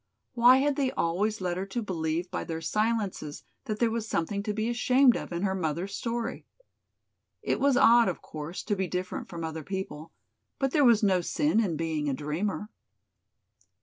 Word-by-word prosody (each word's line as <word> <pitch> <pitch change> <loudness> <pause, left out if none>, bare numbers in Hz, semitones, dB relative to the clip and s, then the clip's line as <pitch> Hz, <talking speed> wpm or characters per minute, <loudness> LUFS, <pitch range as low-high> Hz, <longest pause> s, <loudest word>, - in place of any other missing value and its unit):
Why 245 +1 +7
had 280 +1 +1
they 275 -2 +1
always 200 +6 0
led 180 -1 -1
her 190 - -2
to 235 +5 -3
believe 170 -2 -2
by - - -2
their 165 -1 -4
silences 205 -4 -2 0.2
that 215 - -3
there 230 0 +2
was 225 -1 -3
something 200 +2 -1
to 210 +1 -2
be 215 +2 -1
ashamed 250 +2 +4
of - - -5
in 170 +2 -3
her 190 -1 +1
mother's 180 +2 -2
story? 235 +2 -3 1.0
It - - 0
was 275 -2 +3
odd, 235 -1 +6
of 180 - -4
course, 155 +3 -7
to 210 - -1
be 190 -1 -1
different 180 +1 -4
from 170 -1 -6
other 160 0 -4
people, 190 -3 -6 0.5
but 270 -1 0
there 295 0 +3
was 235 -4 +5
no 190 -3 +3
sin 295 - +1
in 185 -8 0
being 155 -2 -1
a 135 - 0
dreamer. 175 +9 -3
195 Hz, 185 wpm, -28 LUFS, 165-230 Hz, 1.0 s, Why